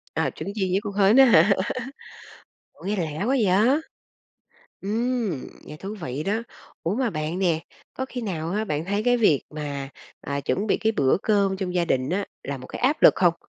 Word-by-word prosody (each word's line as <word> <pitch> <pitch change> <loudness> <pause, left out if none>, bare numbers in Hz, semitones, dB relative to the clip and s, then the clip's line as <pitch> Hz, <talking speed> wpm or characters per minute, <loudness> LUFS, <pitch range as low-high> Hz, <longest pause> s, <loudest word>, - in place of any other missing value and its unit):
À, - - +1
trứng - - -5
chiên 195 -3 0
với 190 - +2
con 205 -2 -4
hến 200 +3 +4
á 270 - +9
hả? 220 -4 +6 1.2
Ủa, - - -17
nghe 205 +2 0
lạ 155 -4 -3
quá - - -2
vậy? 250 -5 +2 1.3
Ừm, 225 - -1 0.2
nghe 150 - -9
thú 195 +6 -6
vị 140 -2 -4
đó. 215 +4 0 0.4
Ủa 170 - 0
mà 250 0 0
bạn 155 +1 -3
nè, 170 -4 +1 0.3
có 260 - -3
khi 250 - -5
nào 170 -7 -3
á, 210 +2 0
bạn 155 -5 -2
thấy 200 +3 -1
cái 245 0 +4
việc 205 - +3
mà, 145 -3 -5 0.3
à, 140 0 -3
chuẩn 200 +8 -1
bị - - +2
cái 220 - 0
bữa 135 -10 +3
cơm 200 -3 +2
trong 185 -2 -4
gia 175 -1 +2
đình 130 -2 0
á 195 +3 0 0.2
là 140 0 -3
một 130 - -10
cái - - -8
áp 275 +5 +2
lực - - +8
không? 175 -2 +4
195 Hz, 210 wpm, -24 LUFS, 155-220 Hz, 1.3 s, á